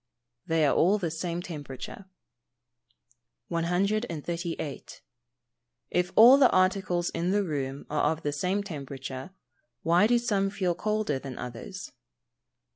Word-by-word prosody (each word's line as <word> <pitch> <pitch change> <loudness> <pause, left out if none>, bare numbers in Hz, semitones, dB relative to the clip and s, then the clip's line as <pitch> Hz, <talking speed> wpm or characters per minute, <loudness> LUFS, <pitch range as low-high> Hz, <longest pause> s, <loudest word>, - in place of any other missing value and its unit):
_ - - -37
They 160 -1 +3
are 140 - +3
all 185 +5 +4
of 210 - -3
the 170 -3 -1
same 170 +1 -3
temperature. 150 +3 -8 1.4
138. 170 - -2 0.9
_If 180 0 +1
all 245 +5 +9
the 260 - +7
articles 185 -2 +1
in 175 +2 -1
the 205 +1 +2
room 140 -5 -4
are 150 0 +1
of 160 0 -5
the 145 - 0
same 185 +7 -1
temperature, 140 -4 -7 0.5
why 175 +5 +4
do 240 +1 +4
some 205 -5 +1
feel 190 -3 0
colder 210 -6 -1
than 135 -2 -8
others? 125 +11 -7
175 Hz, 130 wpm, -28 LUFS, 150-195 Hz, 1.4 s, all